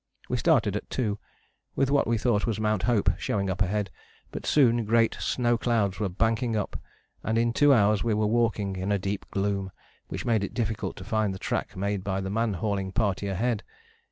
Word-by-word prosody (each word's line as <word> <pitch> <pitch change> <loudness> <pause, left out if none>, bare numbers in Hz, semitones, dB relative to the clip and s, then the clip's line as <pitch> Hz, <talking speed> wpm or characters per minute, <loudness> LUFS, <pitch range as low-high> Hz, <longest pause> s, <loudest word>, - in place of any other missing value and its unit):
We - - 0
started - - +3
at - - -5
2, 105 -5 -1 0.6
with 135 0 +1
what 140 - +3
we 115 0 +2
thought 110 -1 +1
was 110 -2 -1
Mount 105 -2 +1
Hope 105 -7 +3
showing 100 -2 -1
up 95 - -4
ahead, 100 +1 0 0.4
but - - -6
soon 120 -5 +4
great 115 +1 +3
snow 120 -2 +1
clouds 110 -6 0
were 105 -3 0
banking 110 +4 0
up 105 - -3 0.4
and 110 +1 0
in 115 0 +2
two 145 +4 +5
hours 105 -5 +4
we 115 -2 +1
were 105 0 +1
walking 105 -3 0
in 95 +2 -2
a 100 - +3
deep 100 +1 -4
gloom 100 -1 -1 0.4
which - - -5
made 110 -4 +2
it - - -5
difficult 115 -3 -2
to 95 - -9
find 110 -2 0
the - - -6
track - - -3
made 100 0 -1
by 95 -1 -1
the 95 0 -3
man 115 0 0
hauling 100 0 -2
party 100 -3 0
ahead. 105 +4 0
105 Hz, 205 wpm, -27 LUFS, 100-115 Hz, 0.6 s, two